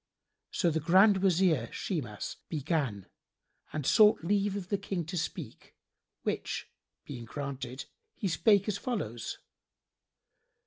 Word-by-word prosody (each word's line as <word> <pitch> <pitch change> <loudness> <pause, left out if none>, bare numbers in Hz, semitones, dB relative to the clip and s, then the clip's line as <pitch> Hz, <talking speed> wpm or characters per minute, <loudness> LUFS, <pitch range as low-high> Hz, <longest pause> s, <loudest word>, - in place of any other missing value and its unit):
So 175 -3 +1
the 160 - 0
Grand 190 +6 +6
Wazir 175 -10 +3
Shimas 120 - -4
began 140 - -1 0.7
and 150 -3 -3
sought 210 -1 +6
leave 200 +2 +1
of 190 -3 -5
the 200 - +1
King 190 -4 -3
to 175 +4 -5
speak, 165 - -5 0.5
which - - -3 0.3
being 120 -5 -7
granted, 135 0 -5 0.3
he 205 - -2
spake 200 +3 +4
as 205 -1 -1
follows. 120 - -3
170 Hz, 120 wpm, -31 LUFS, 135-200 Hz, 0.7 s, Grand